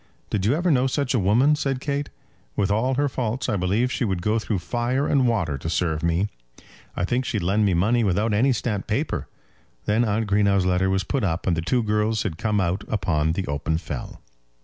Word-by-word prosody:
"Did 100 Hz, -1 st, 0 dB
you 125 Hz, -, +3 dB
ever 175 Hz, +2 st, +1 dB
know 130 Hz, -2 st, +3 dB
such 140 Hz, 0 st, -1 dB
a 125 Hz, -, +2 dB
woman?" 120 Hz, +10 st, +4 dB
said 135 Hz, -3 st, -1 dB
Kate; 140 Hz, +1 st, -2 dB, 0.5 s
"with 100 Hz, 0 st, +1 dB
all 125 Hz, +5 st, +1 dB
her 145 Hz, +2 st, +2 dB
faults 125 Hz, -2 st, -2 dB
I -, -, 0 dB
believe 100 Hz, +7 st, +1 dB
she -, -, -1 dB
would 95 Hz, -6 st, -1 dB
go 110 Hz, +3 st, +2 dB
through 110 Hz, -2 st, -2 dB
fire 120 Hz, +8 st, -1 dB
and 135 Hz, -3 st, +3 dB
water 90 Hz, -12 st, 0 dB
to 80 Hz, -, -4 dB
serve 80 Hz, -2 st, 0 dB
me. 85 Hz, +4 st, +1 dB, 0.7 s
I 90 Hz, -, 0 dB
think 120 Hz, +6 st, 0 dB
she'd 110 Hz, -7 st, -2 dB
lend 100 Hz, +4 st, +2 dB
me 95 Hz, -3 st, +2 dB
money 110 Hz, +7 st, +2 dB
without 105 Hz, +3 st, +1 dB
any 125 Hz, +7 st, +3 dB
stamped 110 Hz, -5 st, -2 dB
paper." -, -, -2 dB, 0.6 s
Then 110 Hz, +3 st, +2 dB
Aunt 110 Hz, 0 st, 0 dB
Greenow's 100 Hz, -2 st, +2 dB
letter 90 Hz, +1 st, +2 dB
was 95 Hz, 0 st, +1 dB
put 135 Hz, -5 st, -2 dB
up, 85 Hz, -3 st, -1 dB
and 90 Hz, -, +2 dB
the 80 Hz, -, -1 dB
two 120 Hz, +8 st, +1 dB
girls 105 Hz, 0 st, 0 dB
had 80 Hz, -, -4 dB
come 105 Hz, -2 st, +1 dB
out 95 Hz, +2 st, 0 dB
upon 80 Hz, -6 st, 0 dB
the 95 Hz, +2 st, -2 dB
open 70 Hz, +2 st, -1 dB
fell. 75 Hz, -6 st, -6 dB
105 Hz, 215 wpm, -24 LUFS, 90-125 Hz, 0.7 s, woman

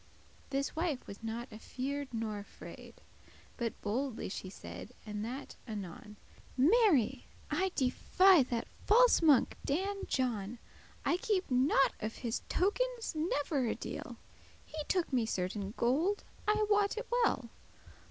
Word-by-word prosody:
This 275 Hz, 0 st, -1 dB
wife 320 Hz, -5 st, -1 dB
was 200 Hz, -, -9 dB
not 230 Hz, +2 st, -4 dB
afeared 270 Hz, +6 st, -4 dB
nor 220 Hz, -3 st, -2 dB
afraid, 205 Hz, -, -11 dB, 0.6 s
But 235 Hz, -3 st, -3 dB
boldely 245 Hz, +4 st, -2 dB
she 185 Hz, -, -5 dB
said, 210 Hz, +4 st, -9 dB
and 210 Hz, -1 st, -4 dB
that 255 Hz, +5 st, -6 dB
anon; 210 Hz, 0 st, -7 dB, 0.4 s
"Mary! 325 Hz, -, +4 dB, 0.2 s
I 380 Hz, 0 st, +1 dB
defy 355 Hz, +7 st, +5 dB
that 235 Hz, -2 st, -1 dB, 0.2 s
false 480 Hz, +1 st, +6 dB
monk 295 Hz, -6 st, +5 dB
Dan 390 Hz, +7 st, -1 dB
John, 235 Hz, -4 st, -1 dB, 0.5 s
I 340 Hz, -, +3 dB
keep* 380 Hz, -5 st, 0 dB
not 265 Hz, +2 st, +4 dB
of 215 Hz, +1 st, -4 dB
his 235 Hz, -1 st, -3 dB
tokens 475 Hz, +5 st, 0 dB
never 290 Hz, -4 st, 0 dB
a -, -, 0 dB
deal: -, -, -5 dB
*care -, -, -8 dB
whit -, -, -15 dB, 0.5 s
He 310 Hz, -1 st, -5 dB
took 360 Hz, -6 st, 0 dB
me 240 Hz, -3 st, +2 dB
certain 195 Hz, +1 st, -2 dB
gold, 315 Hz, +12 st, +2 dB, 0.2 s
I 425 Hz, 0 st, +3 dB
wot 410 Hz, 0 st, +3 dB
it 465 Hz, -, -3 dB, 0.2 s
well. 250 Hz, -, 0 dB
270 Hz, 140 wpm, -33 LUFS, 225-370 Hz, 0.6 s, false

